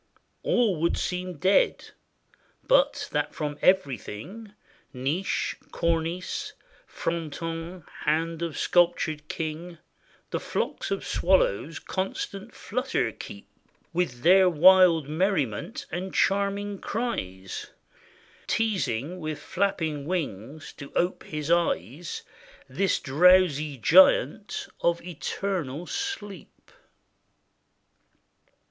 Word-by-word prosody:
All 230 - +2
would 170 - +2
seem 180 -2 -3
dead, 190 +5 +2 0.7
but - - +3
that - - -1
from 150 -1 -4
everything, 185 - 0 0.4
Niche, 140 +9 -1 0.2
cornice, 170 +1 -1 0.3
fronton, 165 +1 -4 0.2
hand 165 +2 0
of 170 -3 -3
sculptured 170 -3 +2
king, 165 +3 -5 0.5
The - - -1
flocks - - -3
of 195 - -2
swallows 165 - +2
constant 195 +3 -4
flutter 255 - -1
keep, 100 -1 -10 0.5
With 145 -9 -1
their 185 +1 +7
wild 175 -2 +6
merriment 160 - -1
and 180 +3 -4
charming 200 0 +1
cries; 95 - -4 0.8
Teasing, 185 - -1
with 155 -2 -4
flapping 165 -7 -1
wings 150 - -4
to 140 -1 -9
ope 175 +2 +1
his 150 +1 -4
eyes. 165 - 0 0.4
This 185 +8 +1
drowsy 155 -1 +4
giant 190 - +4 0.2
of 170 0 +2
eternal 175 -3 -3
sleep. 395 - -6
170 Hz, 90 wpm, -26 LUFS, 150-190 Hz, 0.8 s, their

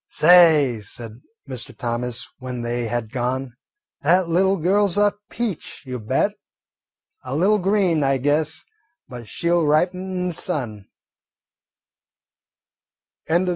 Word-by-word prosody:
"Say," 155 -7 +5
said 115 +2 -9 0.3
Mr. 130 -3 -5
Thomas 120 0 -3
when 125 -2 -5
they 120 0 -2
had 115 -1 -3
gone, 125 0 -3 0.5
"that 175 +4 +3
little 190 +3 +2
girl 195 +5 +2
's 180 - 0
a 205 0 +3 0.2
peach, 225 -8 -5
you 125 -1 -5
bet; 110 - 0 0.9
a 130 +1 -5
little 200 +7 +3
green, 185 -5 +2
I 135 0 +2
guess, 145 +3 0 0.4
but 120 -3 -9
she 170 +11 -2
'll 175 -1 +3
ripen 175 +5 +2
in 185 -1 -3
the - - -3
sun." 110 -10 -3
145 Hz, 125 wpm, -22 LUFS, 120-180 Hz, 0.9 s, Say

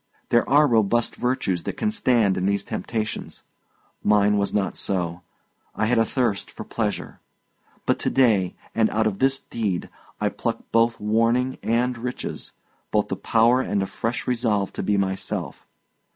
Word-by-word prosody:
There 120 - +3
are 145 +2 +6
robust 115 -1 +2
virtues 125 -8 -1
that - - -4
can 215 - 0
stand 120 - +3
in 95 +1 0
these 100 0 0
temptations; 110 -2 -4 0.6
mine 105 0 +3
was 100 - 0
not 95 -3 0
so; 90 -3 -1 0.5
I 110 - +1
had 120 +1 +2
a 115 - +4
thirst 115 -5 -1
of - - -7
pleasure. - - -3 0.7
But - - +1
to - - 0
day, 110 -9 +3 0.2
and 110 -1 +3
out 110 +1 +1
of 105 -3 -1
this 135 0 +3
deed, 105 -6 -3 0.3
I - - +1
pluck - - -3
both 115 0 +3
warning 115 +4 +1
and 120 +2 +1
riches 125 +2 -5 0.4
both - - +1
the - - -1
power 115 +3 +3
and 100 -5 0
a - - -1
fresh 115 +5 -3
resolve 115 -6 0
to - - -4
be 100 +1 +1
myself. 95 -1 -3
110 Hz, 165 wpm, -24 LUFS, 100-125 Hz, 0.7 s, are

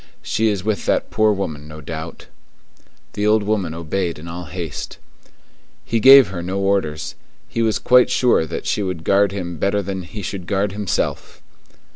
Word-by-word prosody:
She 110 +1 0
is 100 -4 -1
with 110 0 -2
that - - 0
poor 110 0 +3
woman, 80 -7 -4
no 75 0 -10
doubt." 80 +2 -7 0.9
The 105 +1 -1
old 110 0 +3
woman 100 -6 -1
obeyed 85 +1 -2
in 80 +3 -10
all 85 +1 -6
haste. 85 -3 -6 0.9
He 115 - 0
gave 135 -1 +8
her 90 -2 -5
no 95 +3 -3
orders; 95 -6 -1 0.3
he 115 - -3
was 110 -2 +2
quite 125 0 +4
sure 120 -10 +2
that - - -5
she - - 0
would 90 -4 -3
guard 100 +1 +3
him 90 -4 -5
better 100 +4 0
than 95 0 -4
he 100 +4 -8
should 90 -1 -5
guard 100 0 0
himself. 100 -1 -3
95 Hz, 175 wpm, -20 LUFS, 85-105 Hz, 0.9 s, gave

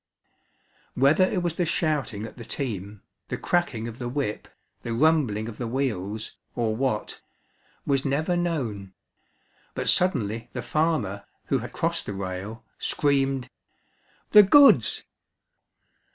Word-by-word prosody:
Whether 140 +8 +5
it 185 -2 -1
was 170 -2 0
the 180 - +2
shouting 150 - -1
at 110 - -10
the 120 - -9
team, 105 -6 -5 0.2
the - - -3
cracking 135 -11 0
of 115 0 -8
the 120 -1 -3
whip, 130 -5 -3 0.3
the 115 -1 -3
rumbling 130 -7 +2
of 115 - -8
the 120 - -2
wheels, 110 -5 -3 0.2
or 115 -3 0
what, 125 -3 -2 0.6
was 135 -1 +1
never 155 +6 0
known; 120 - -2 0.8
but - - -3
suddenly 115 - +1
the - - -4
farmer, 150 - 0 0.2
who - - +1
had - - -7
crossed - - -2
the - - -3
rail, 100 +3 -6
screamed, 135 -2 0 0.8
"The 210 - +10
goods!" 280 +8 +6
125 Hz, 130 wpm, -25 LUFS, 110-155 Hz, 0.8 s, The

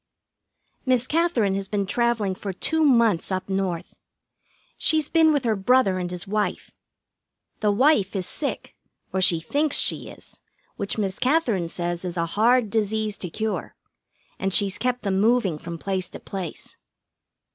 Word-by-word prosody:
Miss 255 -2 +2
Katherine 295 - +1
has 195 0 -2
been 200 -1 -1
travelling 230 -2 0
for 195 +1 -5
two 320 - 0
months 230 - +3
up 185 0 -2
North. 190 -3 -2 0.8
She's 310 -2 +1
been 325 -1 +5
with 290 -3 +1
her 225 -2 +2
brother 195 -2 +3
and 180 -1 -3
his 180 +1 -4
wife. 210 +1 -2 0.9
The 210 - +1
wife 215 -3 +3
is 185 -2 -1
sick, 290 - -4 0.4
or 190 - 0
she 175 -2 +5
thinks 285 - 0
she - - 0
is, - - -13 0.4
which 200 +2 -4
Miss 195 -2 -2
Katherine 250 - +1
says 175 0 -3
is 180 -1 -5
a 170 - +1
hard 230 0 +3
disease 215 -1 0
to 180 - -4
cure, 220 +6 -3 0.6
and 195 - -1
she's 195 0 +1
kept 250 0 -1
them 195 -2 0
moving 215 -8 +2
from 170 +1 -6
place 185 0 -2
to - - -9
place. 185 -5 -7
205 Hz, 155 wpm, -24 LUFS, 185-245 Hz, 0.9 s, been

